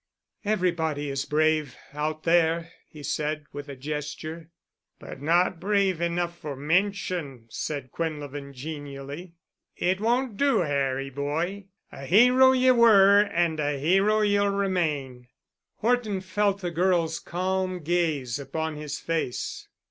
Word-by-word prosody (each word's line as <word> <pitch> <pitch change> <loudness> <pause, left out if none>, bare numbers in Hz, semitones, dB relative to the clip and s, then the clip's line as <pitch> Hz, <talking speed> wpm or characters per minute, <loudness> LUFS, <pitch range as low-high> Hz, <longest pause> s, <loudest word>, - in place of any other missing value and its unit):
"Everybody 170 -8 0
is 135 0 -2
brave—out 155 0 -1
there," 165 0 +2 0.2
he 150 -2 -12
said, 150 +1 -2
with 145 0 -7
a 140 - -6
gesture. 150 +3 -6 0.5
"But 135 - -10
not 170 +3 +2
brave 195 -3 +1
enough 170 0 -1
for 145 -2 -5
mention," 165 - -1
said 140 -4 -4
Quinlevin 145 -3 -5
genially. 145 +3 -7 0.4
"It 185 +2 0
won't 240 -1 0
do, 280 -3 +3
Harry 135 -3 -1
boy. 160 +8 -3 0.3
A 135 - -9
hero 250 - +6
ye 255 0 +4
were 205 -5 +7
and 170 -5 0
a 145 -1 0
hero 195 +9 +3
ye'll 205 -1 +3
remain." 155 -11 -1 0.5
Horton 220 -4 0
felt 200 +1 0
the 175 -2 -3
girl's 170 -1 +1
calm 185 0 -2
gaze 150 -7 0
upon 160 +2 -4
his 150 0 -5
face. 160 -7 -3
165 Hz, 125 wpm, -26 LUFS, 145-190 Hz, 0.5 s, were